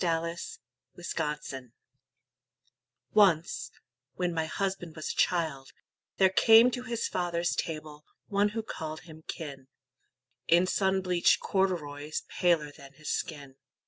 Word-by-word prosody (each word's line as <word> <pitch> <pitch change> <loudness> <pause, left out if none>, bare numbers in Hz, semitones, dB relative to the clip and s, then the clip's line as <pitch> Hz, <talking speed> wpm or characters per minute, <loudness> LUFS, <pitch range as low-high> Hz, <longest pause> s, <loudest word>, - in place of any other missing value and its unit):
BLOOD 170 -1 0 0.6
FEUD 150 -7 -4 1.4
Once, 185 -6 +3 0.5
when 180 -1 -1
my 160 -1 0
husband 190 -3 -3
was 155 - -3
a - - -7
child, 155 -7 0 0.4
there 190 -1 +5
came 225 +5 +7
To 245 - -3
his 240 -2 -2
father's 175 -1 -1
table, 155 -2 -5 0.2
one 205 0 +2
who 225 - -1
called 155 -6 -6
him 160 -1 -13
kin, 140 -4 -7 0.8
In 175 +2 +5
sunbleached 190 -2 +2
corduroys 155 -6 -1 0.2
paler 165 -5 +3
than 140 -1 -14
his 155 +2 -5
skin. 140 -4 -4
170 Hz, 115 wpm, -29 LUFS, 150-190 Hz, 1.4 s, came